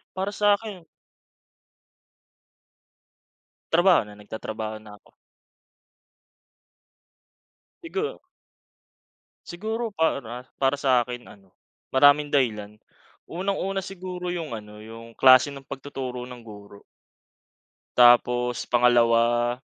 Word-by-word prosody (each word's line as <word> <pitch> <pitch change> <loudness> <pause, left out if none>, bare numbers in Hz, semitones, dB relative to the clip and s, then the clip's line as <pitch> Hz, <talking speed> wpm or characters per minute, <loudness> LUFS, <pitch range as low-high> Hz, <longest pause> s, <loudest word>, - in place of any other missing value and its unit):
Para 190 +2 -2
sa'kin 205 -3 0 2.9
Trabaho 175 +1 +5
na. 105 - -13
Nagtatrabaho 110 +1 -6
na 105 -1 -13
ako. - - -28 2.7
Sigu 395 +6 -4 1.3
siguro 220 +5 -4
para 130 - -2 0.2
para 135 0 +1
sa 130 -4 +2
akin 120 0 -8
ano, 95 -2 -18 0.4
maraming 145 +2 +4
dahilan. 105 -6 -1 0.5
Unang-una 195 +2 -3
siguro 180 -1 -6
yung 160 -9 -5
ano, 105 0 -12
yung 115 +1 -12
klase 130 +3 +5
ng 140 - -10
pagtuturo 135 -2 -7
ng 125 -1 -11
guro. 105 -2 -13 1.1
Tapos 120 0 +4
pangalawa 120 0 +3
125 Hz, 85 wpm, -24 LUFS, 115-175 Hz, 2.9 s, Trabaho